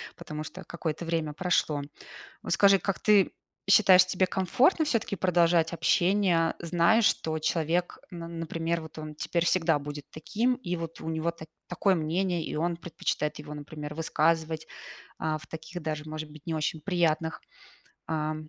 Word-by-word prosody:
потому 155 0 -6
что 185 +4 -9
какое-то 165 -1 -4
время 165 -3 -1
прошло. 155 -4 +1 0.6
Вот - - -4
скажи, 195 +1 +6
как 195 -1 -2
ты 205 -3 +4 0.4
считаешь, 190 -3 +7
тебе 185 0 +1
комфортно 250 - +2
всё-таки 230 -7 0
продолжать 170 -2 +3
общение, 170 +1 +2
зная, 170 +6 +3
что 160 -7 +1
человек, 165 +2 0
н 175 - -7
на 165 - -6
например, 165 0 -3
вот 160 0 -11
он 155 -1 -7
теперь 170 +3 -1
всегда 165 -3 +3
будет 145 0 -7
таким, 225 +11 0
и 180 -8 -4
вот 165 -1 -6
у - - -7
него 160 +1 -1
та 165 -1 -11 0.2
такое 185 +2 +2
мнение, 170 +2 0
и - - -5
он 170 +2 0
предпочитает 155 -3 -3
его, 150 0 -8
например, 150 0 -7
высказывать, 160 0 0 0.5
а, 155 -1 -1
в 155 - -14
таких 160 +2 -7
даже, 155 -1 -3
может 155 0 -5
быть, 155 -1 -14
не 165 - -1
очень 155 0 -2
приятных, 165 -3 0 0.7
а 155 -1 -1
165 Hz, 160 wpm, -28 LUFS, 155-180 Hz, 0.7 s, считаешь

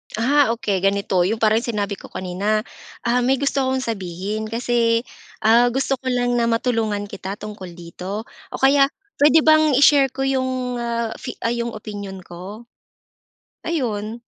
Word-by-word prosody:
Ah 250 +2 +3
okey. 205 -4 -1
Ganito 195 -2 +1
yung 220 +3 -2
parang 220 0 +4
sinabi 205 -4 -3
ko - - -11
kanina, 200 +4 -1 0.4
ah 240 +1 +2
"May 255 +2 +2
gusto 275 +1 0
akong 260 0 0
sabihin 200 0 -4
kasi, 230 0 +1 0.4
ah, 230 +3 +5
gusto 265 +2 0
ko 260 - -8
lang 245 -1 +1
na 235 - +2
matulungan 230 -3 0
kita 195 0 -5
tungkol 200 -5 -9
dito 180 +5 -6 0.3
o - - -2
kaya 275 +1 +5 0.3
puwede 300 +2 +6
bang 310 -2 +5
i-share 280 0 +6
ko 270 0 -2
yung, 260 -2 -1
ah, 235 -1 -2
fi - - -6
ah, 230 - +1
yung 235 -1 -3
opinyon 200 -3 -7
ko?" 185 +7 -9 1.0
Ayun. 230 -8 -2
230 Hz, 155 wpm, -21 LUFS, 205-255 Hz, 1.0 s, puwede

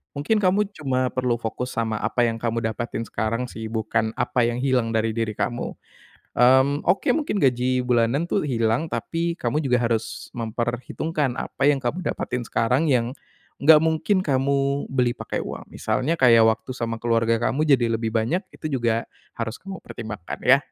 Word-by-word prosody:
mungkin 150 +10 +1
kamu 195 +1 +3 0.2
cuma 130 -3 0
perlu 125 -2 0
fokus 120 +2 -4
sama 110 -2 -1
apa 120 +2 0
yang 115 -1 0
kamu 115 0 -1
dapatin 115 0 -4
sekarang 115 +2 -2
sih, 110 0 -6
bukan 110 0 -1
apa 120 -1 +1
yang 120 +2 -2
hilang 125 -4 +1
dari 110 0 +1
diri 110 -2 -2
kamu. 120 0 -3 0.6
Mmm, 130 +4 +4
oke, 195 - +1
mungkin 290 -10 -1
gaji 130 -2 +2
bulanan 125 +6 +1
tuh 195 - 0
hilang, 115 +1 +1
tapi 170 +1 -1
kamu 150 0 -2
juga 125 -2 +2
harus 115 -2 -2
memperhitungkan 120 +5 -2
apa 135 - -3
yang 135 - -2
kamu 145 +9 -3
dapatin 125 -1 -2
sekarang 125 +7 +1
yang 125 -3 +1 0.4
enggak 155 +1 +7
mungkin 160 +4 +1
kamu 140 -1 +1
beli 125 -2 +1
pakai - - -4
uang, - - -7
misalnya 150 +6 -1
kayak 115 -7 +6
waktu 110 +3 0
sama 115 -2 -3
keluarga 115 -1 +2
kamu 155 +4 0
jadi 125 -6 +3
lebih 115 -1 -3
banyak, 115 +10 +1 0.2
itu 155 - -5
juga 115 -3 +1 0.3
harus 115 0 -4
kamu 195 0 -9
pertimbangkan 110 -7 -7
ya. 135 +2 +7
125 Hz, 170 wpm, -24 LUFS, 115-140 Hz, 0.6 s, enggak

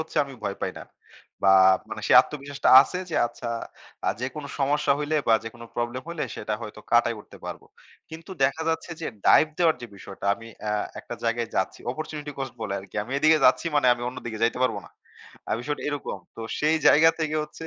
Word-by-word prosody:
হচ্ছে 160 0 -7
আমি 135 -1 -10
ভয় 100 - -3
পাই 95 - -2
না। - - -9 0.6
বা 95 -1 +6 0.4
মানে - - -5
সে - - +2
আত্মবিশ্বাসটা 140 0 -3
আছে 180 - -5
যে - - -2
আচ্ছা 120 0 -7 0.6
আ - - +4
যেকোনো 135 +3 -5
সমস্যা 145 +1 +2
হইলে 150 +1 -1
বা 115 - +7
যেকোনো 115 +1 -9
প্রবলেম 120 +2 -3
হইলে 170 -3 -3
সেটা 105 0 -3
হয়তো 105 -1 -8
কাটায় 120 -1 +4
উঠতে - - -15
পারবো। - - -7 0.4
কিন্তু 160 +3 -10
দেখা 140 +4 0
যাচ্ছে 165 +1 -2
যে 160 - -3 0.2
ডাইভ - - +7
দেওয়ার 165 -3 +3
যে - - -5
বিষয়টা 100 +1 -8
আমি 115 +2 -12
অ্যা 105 0 -1 0.3
একটা - - -7
জায়গায় 115 0 0
যাচ্ছি। 95 - -1
অপরচুনিটি 150 +1 -6
কোস্ট 135 -2 -4
বলে 100 -3 -3
আরকি। 95 +1 -12
আমি 125 - -8
এদিকে 155 +2 +5
যাচ্ছি 130 +6 +4
মানে 145 - +3
আমি 120 - -9
অন্যদিকে 120 -3 -6
যাইতে 115 +1 +2
পারবো 125 - 0
না। - - -17 0.6
আ - - +1
বিষয়টা 145 +4 -4
এরকম। 145 -1 -4 0.2
তো - - -8 0.2
সেই 155 +2 +3
জায়গা 160 +2 +7
থেকে 155 -1 -1
হচ্ছে 150 +2 -9
135 Hz, 200 wpm, -25 LUFS, 115-155 Hz, 0.6 s, বা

